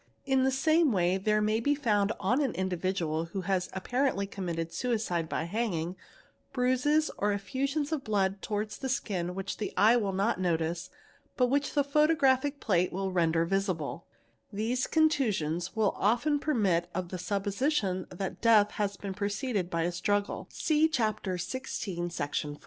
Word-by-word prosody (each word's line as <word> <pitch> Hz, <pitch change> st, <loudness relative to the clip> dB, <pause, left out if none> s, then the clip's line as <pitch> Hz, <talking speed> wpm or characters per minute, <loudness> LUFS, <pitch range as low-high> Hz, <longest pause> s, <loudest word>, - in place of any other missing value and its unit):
In 265 Hz, -1 st, +2 dB
the 265 Hz, -, +3 dB
same 315 Hz, +3 st, +3 dB
way: 180 Hz, -2 st, +2 dB
there 215 Hz, +2 st, +2 dB
may 215 Hz, +1 st, +2 dB
be 285 Hz, +5 st, +2 dB
found 210 Hz, -7 st, +1 dB
on 245 Hz, +9 st, +1 dB
an 270 Hz, -4 st, -1 dB
individual 180 Hz, -3 st, -1 dB
who 180 Hz, +3 st, -5 dB
has 185 Hz, 0 st, -1 dB
apparently 245 Hz, +2 st, 0 dB
committec 170 Hz, -4 st, -4 dB
suicide 210 Hz, -10 st, -1 dB
by -, -, -1 dB
hanging, 180 Hz, -3 st, -2 dB, 0.6 s
bruises 270 Hz, +5 st, +2 dB
or 205 Hz, +1 st, +2 dB
effusions 275 Hz, +9 st, -2 dB
of 305 Hz, -4 st, -1 dB
blood 195 Hz, -2 st, 0 dB
towards 210 Hz, 0 st, -3 dB
the 265 Hz, -, -3 dB
skin 180 Hz, -9 st, -2 dB
whick 195 Hz, 0 st, -4 dB
the 210 Hz, -, -3 dB
eye 220 Hz, +3 st, +6 dB
will 210 Hz, -5 st, +1 dB
not 195 Hz, +2 st, 0 dB
notice 170 Hz, 0 st, -1 dB, 0.5 s
but 250 Hz, -1 st, +3 dB
which 285 Hz, +1 st, 0 dB
the 285 Hz, -, +4 dB
photographic 285 Hz, -1 st, +2 dB
plate 180 Hz, -4 st, +1 dB
will 190 Hz, +1 st, -2 dB
rende: 165 Hz, -2 st, +2 dB
visible; 185 Hz, -4 st, -2 dB, 0.4 s
these 230 Hz, +5 st, -1 dB
contusions 215 Hz, -, +1 dB
will 215 Hz, -3 st, +2 dB
often 245 Hz, +8 st, +2 dB
permit 200 Hz, -, +1 dB
of 180 Hz, -1 st, -3 dB
the 185 Hz, -, -5 dB
supposition 200 Hz, -, -1 dB
that 185 Hz, +1 st, -5 dB
deatl 215 Hz, -3 st, +5 dB
has 200 Hz, -1 st, -2 dB
been 195 Hz, -2 st, -5 dB
preceded 200 Hz, -1 st, -2 dB
by 170 Hz, -2 st, 0 dB
a 175 Hz, -, 0 dB
struggle 200 Hz, +3 st, -1 dB
(see 310 Hz, 0 st, +2 dB
Chapter 215 Hz, -9 st, -1 dB
XVI, 175 Hz, -4 st, -4 dB
Section 145 Hz, -2 st, -2 dB
iv). -, -, -12 dB
205 Hz, 160 wpm, -29 LUFS, 180-255 Hz, 0.6 s, eye